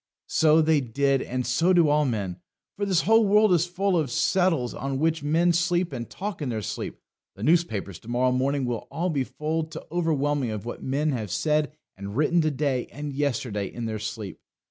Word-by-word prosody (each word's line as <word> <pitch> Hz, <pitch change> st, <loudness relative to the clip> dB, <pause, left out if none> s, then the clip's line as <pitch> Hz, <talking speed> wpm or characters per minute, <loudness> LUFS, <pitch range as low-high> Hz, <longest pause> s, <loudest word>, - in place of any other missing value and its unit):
So 160 Hz, 0 st, +4 dB
they 155 Hz, -2 st, +3 dB
did, 135 Hz, +2 st, +1 dB
and 125 Hz, 0 st, -3 dB
so 165 Hz, +9 st, +2 dB
do 170 Hz, -3 st, +5 dB
all 150 Hz, 0 st, +3 dB
men. 100 Hz, -8 st, -2 dB, 0.4 s
For 205 Hz, 0 st, -2 dB
this 185 Hz, -4 st, +3 dB
whole 225 Hz, +4 st, +5 dB
world 210 Hz, -1 st, +4 dB
is 175 Hz, 0 st, +2 dB
full 190 Hz, +2 st, 0 dB
of 155 Hz, -6 st, +1 dB
settles 165 Hz, -3 st, +1 dB
on 135 Hz, 0 st, -3 dB
which 160 Hz, +2 st, +1 dB
men 165 Hz, +4 st, +2 dB
sleep 175 Hz, +1 st, +1 dB
and 120 Hz, -, -5 dB
talk 195 Hz, -3 st, -5 dB
in 140 Hz, -, -2 dB
their 110 Hz, -3 st, -3 dB
sleep. -, -, -5 dB, 0.4 s
The 100 Hz, -, -8 dB
newspapers 115 Hz, -, +1 dB
to -, -, -18 dB
morrow 125 Hz, +2 st, +1 dB
morning 135 Hz, +2 st, 0 dB
will 120 Hz, -2 st, -3 dB
all 175 Hz, +2 st, -1 dB
be 140 Hz, -4 st, 0 dB
full 155 Hz, +4 st, -2 dB
to 160 Hz, -, -9 dB
overflowing 145 Hz, -6 st, 0 dB
of 110 Hz, -1 st, -5 dB
what 120 Hz, -, -6 dB
men 145 Hz, +3 st, 0 dB
have 110 Hz, -6 st, -3 dB
said 150 Hz, -, 0 dB, 0.2 s
and 100 Hz, +3 st, -7 dB
written 165 Hz, +3 st, +3 dB
to 155 Hz, -, +2 dB
day 140 Hz, -3 st, -1 dB
and 145 Hz, 0 st, -6 dB
yesterday 125 Hz, -8 st, -1 dB
in 120 Hz, -, -5 dB
their 110 Hz, -1 st, -3 dB
sleep. 105 Hz, -2 st, -6 dB
145 Hz, 205 wpm, -25 LUFS, 120-165 Hz, 0.4 s, do